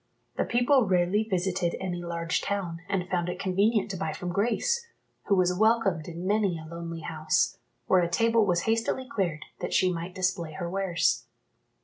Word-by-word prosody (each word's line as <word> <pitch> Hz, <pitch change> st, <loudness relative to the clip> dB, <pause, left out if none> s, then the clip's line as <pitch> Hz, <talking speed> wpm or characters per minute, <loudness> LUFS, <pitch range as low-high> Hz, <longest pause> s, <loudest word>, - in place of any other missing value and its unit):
The -, -, 0 dB
people 245 Hz, 0 st, +3 dB
rarely 185 Hz, +2 st, +2 dB
visited 185 Hz, -3 st, -1 dB
any 180 Hz, -2 st, -3 dB
large 170 Hz, -1 st, -2 dB
town, 185 Hz, -5 st, -3 dB
and 185 Hz, -3 st, -1 dB
found 180 Hz, -1 st, -1 dB
it 180 Hz, -, -4 dB
convenient 200 Hz, +3 st, +1 dB
to 190 Hz, -, -4 dB
buy 160 Hz, -4 st, -2 dB
from 180 Hz, -1 st, -4 dB
Grace, 470 Hz, -, 0 dB, 0.4 s
who 200 Hz, -, +3 dB
was 180 Hz, -1 st, +3 dB
welcomed 215 Hz, -6 st, +2 dB
in 170 Hz, +1 st, -6 dB
many 200 Hz, -3 st, +1 dB
a 160 Hz, -, -9 dB
lonely 165 Hz, 0 st, -6 dB
house, 155 Hz, -1 st, 0 dB, 0.3 s
where 185 Hz, +6 st, +4 dB
a 170 Hz, -, 0 dB
table 230 Hz, +5 st, +3 dB
was 175 Hz, -2 st, +2 dB
hastily 230 Hz, +3 st, 0 dB
cleared, 185 Hz, -, -2 dB
that -, -, -2 dB
she 185 Hz, -1 st, +3 dB
might 170 Hz, +2 st, -5 dB
display 180 Hz, -3 st, -1 dB
her 175 Hz, +1 st, -4 dB
wares. 185 Hz, -1 st, 0 dB
185 Hz, 175 wpm, -28 LUFS, 170-205 Hz, 0.4 s, where